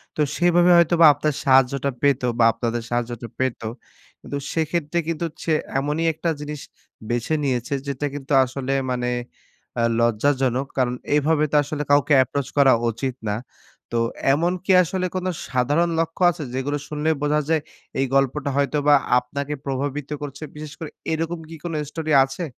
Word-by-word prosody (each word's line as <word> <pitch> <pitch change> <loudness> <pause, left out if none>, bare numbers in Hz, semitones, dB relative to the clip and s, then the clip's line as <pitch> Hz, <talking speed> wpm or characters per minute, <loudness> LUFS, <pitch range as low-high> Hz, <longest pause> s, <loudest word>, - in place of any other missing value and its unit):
তো - - 0 0.2
সেভাবে 175 0 +4
হয়তোবা 170 0 +5
আপনার 150 +1 -1
সাহায্যটা 135 +1 +3
পেত 140 -2 +3 0.2
বা - - +5
আপনাদের 115 +1 -2
সাহায্যটা 120 -1 -3
পেত 130 -2 -1 0.6
কিন্তু 140 - -5 0.2
সেক্ষেত্রে 160 0 -1
কিন্তু 165 0 -2 0.2
সে 160 - +1 0.3
এমনই 150 +4 -1
একটা 165 +2 -2
জিনিস 150 -1 -6 0.5
বেছে 120 +5 -1
নিয়েছে, 125 -1 -1
যেটা 140 +1 -2
কিন্তু 140 0 -8
আসলে 130 +1 -3 0.2
মানে 125 -1 -1 0.7
আ - - +2 0.2
লজ্জাজনক। 130 +3 +1
কারন 125 -2 +1 0.2
এভাবে 150 +1 +2
তো - - 0
আসলে 145 +1 -4
কাউকে 145 +1 +4
approach 135 +1 -4
করা 140 -2 +6 0.2
উচিৎ 120 +3 -3
না। 105 - 0 0.6
তো 120 - +2 0.3
এমন 170 +5 +1
কি 195 - +2
আসলে 185 +2 -2
কোনো 185 0 -1 0.2
সাধারণ 145 +7 +1
লক্ষ্য 165 +2 -2
আছে? 160 - -7
যেগুলো 135 +3 -1
শুনলেই 155 +1 0
বোঝা 150 +1 +2
যায় 160 -1 +2 0.4
এই 135 - +2
গল্পটা 135 +1 +1
হয়তোবা 145 +1 +3 0.2
আপনাকে 140 +4 -5
প্রভাবিত 140 +1 -3
করছে? 145 +1 -7
বিশেষ 150 0 -8
করে 160 - -6 0.2
এরকম 165 +1 -2
কি 165 - -8
কোনো 170 -2 -4
story 155 0 -4
আছে? 135 +6 -5
145 Hz, 155 wpm, -22 LUFS, 130-160 Hz, 0.7 s, করা